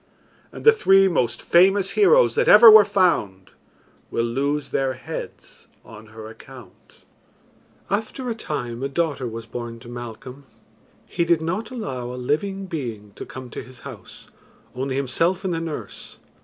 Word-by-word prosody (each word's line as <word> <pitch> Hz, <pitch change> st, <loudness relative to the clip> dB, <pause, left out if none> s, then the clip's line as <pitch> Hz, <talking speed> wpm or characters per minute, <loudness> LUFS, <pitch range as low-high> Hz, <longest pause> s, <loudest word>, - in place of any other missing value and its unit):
And -, -, -10 dB
the 450 Hz, -, +9 dB
three 195 Hz, -, +4 dB
most 125 Hz, -10 st, -1 dB
famous 195 Hz, +2 st, +3 dB
heroes 465 Hz, +4 st, +4 dB
that 470 Hz, +2 st, 0 dB
ever 235 Hz, -, +9 dB
were 215 Hz, -1 st, +9 dB
found 175 Hz, -, 0 dB, 0.6 s
will 115 Hz, -, -1 dB
lose 140 Hz, +5 st, -2 dB
their 135 Hz, -1 st, 0 dB
heads 130 Hz, -, -9 dB, 0.2 s
on 110 Hz, 0 st, -13 dB
her 110 Hz, 0 st, -11 dB
account." 115 Hz, -2 st, -15 dB, 0.8 s
After 220 Hz, +5 st, -3 dB
a 235 Hz, -, -1 dB
time 125 Hz, -, -5 dB
a 135 Hz, -, -2 dB
daughter 145 Hz, -4 st, -2 dB
was 115 Hz, 0 st, -7 dB
born 115 Hz, 0 st, -7 dB
to 120 Hz, -, -12 dB
Malcolm, 120 Hz, +3 st, -9 dB, 0.6 s
he 170 Hz, -, -2 dB
did 170 Hz, -1 st, +2 dB
not 180 Hz, +7 st, -3 dB
allow 205 Hz, -, -5 dB
a -, -, -7 dB
living 190 Hz, +10 st, -2 dB
being 120 Hz, -, -6 dB
to -, -, -9 dB
come 130 Hz, -2 st, -10 dB
to -, -, -6 dB
his 125 Hz, -1 st, -15 dB
house, -, -, -12 dB, 0.5 s
only 130 Hz, +1 st, -3 dB
himself 165 Hz, +8 st, -1 dB
and 185 Hz, -, -1 dB
the 165 Hz, -, -2 dB
nurse. 160 Hz, -2 st, -8 dB
140 Hz, 155 wpm, -22 LUFS, 120-195 Hz, 0.8 s, the